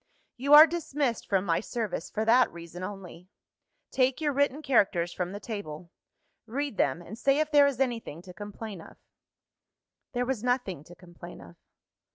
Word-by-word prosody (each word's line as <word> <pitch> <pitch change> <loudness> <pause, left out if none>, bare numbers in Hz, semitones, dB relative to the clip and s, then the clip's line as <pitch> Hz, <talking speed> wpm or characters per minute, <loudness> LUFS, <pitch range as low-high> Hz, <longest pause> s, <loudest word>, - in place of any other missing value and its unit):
"You 280 +3 +5
are 305 +1 +12
dismissed 295 -7 -2
from 195 -1 +1
my 165 -3 +1
service, 220 -7 -4
for 220 - -2
that 240 +3 +4
reason 170 +1 -10
only. 185 -2 -8 0.6
Take 260 +1 +1
your 300 -2 0
written 285 +2 0
characters 190 - +2
from 180 0 -3
the 200 - -6
table; 180 -7 -7 0.6
read 275 +1 -3
them, 140 +6 0
and 220 +7 -10
say 275 +2 +3
if 310 0 0
there 290 -1 +6
is 270 -3 -2
anything 230 - -2
to 180 - -12
complain 205 -1 -8
of." - - -15 1.2
There 245 0 0
was 250 -4 -3
nothing 245 - -1
to 175 - -14
complain 175 -1 -12
of. 85 0 -14
220 Hz, 170 wpm, -28 LUFS, 180-265 Hz, 1.2 s, are